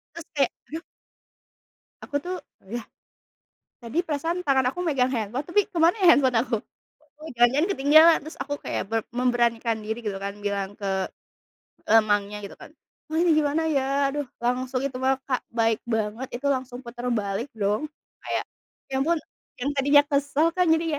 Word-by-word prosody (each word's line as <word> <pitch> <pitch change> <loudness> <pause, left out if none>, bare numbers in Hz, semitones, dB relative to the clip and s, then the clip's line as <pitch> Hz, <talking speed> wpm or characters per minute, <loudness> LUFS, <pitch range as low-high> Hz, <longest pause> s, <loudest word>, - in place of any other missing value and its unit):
Terus 335 -2 -8
kayak, 275 -3 +2 0.2
duh 320 +2 -5 1.2
Aku 285 - -8
tuh, 365 +1 -3 0.4
yah 240 -2 -4 0.9
tadi 240 +5 -4
perasaan 330 +2 -2
tangan 270 -5 +2
aku 355 - -5
megang 280 -7 +2
handphone, 235 +5 -3
tapi 410 +4 +2
kemana 340 -2 +4
ya - - +6
handphone 260 -6 +4
aku? 240 -2 -1 0.7
Oh, 315 - -7
jangan-jangan 265 +8 +4
ketinggalan, 315 +1 +6
terus 315 - -9
aku 285 +1 -2
kayak - - -2
ber 225 0 +1
memberanikan 240 -2 +1
diri 220 +2 -3
gitu 210 -4 -3
kan, 200 +1 -4
bilang 200 -1 -2
ke, 205 -1 -8 1.0
eee, 225 +1 +6
mangnya 205 -1 0
gitu 200 -1 -9
kan, - - -13 0.4
"Mang 320 - +1
ini - - +5
gimana 305 +1 +2
ya?" 280 -4 +1 0.3
Aduh, 290 +1 -3
langsung 250 +2 -1
itu 260 - -11
mah, 260 +1 +1
Kak, 255 -2 0
baik 225 -1 +1
banget, 225 +2 -2
itu 285 - -2
langsung 260 -2 -1
putar 240 -1 -8
balik 210 +3 -2
dong. 215 +8 -1 0.3
Kayak, - - -1 0.5
ya 265 - -3
ampun, 335 +3 +2 0.4
yang 260 +3 -1
tadinya 285 +1 +6
kesel 285 +2 +2
kan 365 -1 +3
jadi 320 +1 +3
260 Hz, 165 wpm, -25 LUFS, 225-300 Hz, 1.2 s, ya